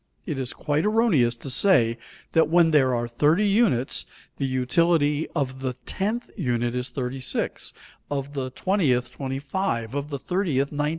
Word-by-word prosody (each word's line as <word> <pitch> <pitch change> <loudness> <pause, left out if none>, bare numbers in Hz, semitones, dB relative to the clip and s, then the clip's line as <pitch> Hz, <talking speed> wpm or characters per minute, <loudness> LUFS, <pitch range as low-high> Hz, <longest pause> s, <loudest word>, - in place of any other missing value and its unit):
It 150 -6 -3
is 130 -2 -3
quite 150 0 -1
erroneous 210 - +3
to 125 +4 -8
say 120 - +3 0.3
that 160 -1 +3
when 170 -1 +5
there 130 -4 +4
are 120 0 -1
30 150 - +2
units 195 - +2 0.3
the 135 - -1
utility 145 +4 +2
of 130 -3 -2
the 130 -1 -2
tenth 220 +5 -2
unit 120 - -1
is 125 +1 -1
36; 130 0 -2 0.4
of 140 0 -3
the 135 -2 -3
twentieth, 130 -7 0
25; 135 - -3
of 145 +1 -3
the 140 - -3
thirtieth, 145 -4 -1
19. 150 0 0
140 Hz, 155 wpm, -25 LUFS, 125-170 Hz, 0.4 s, when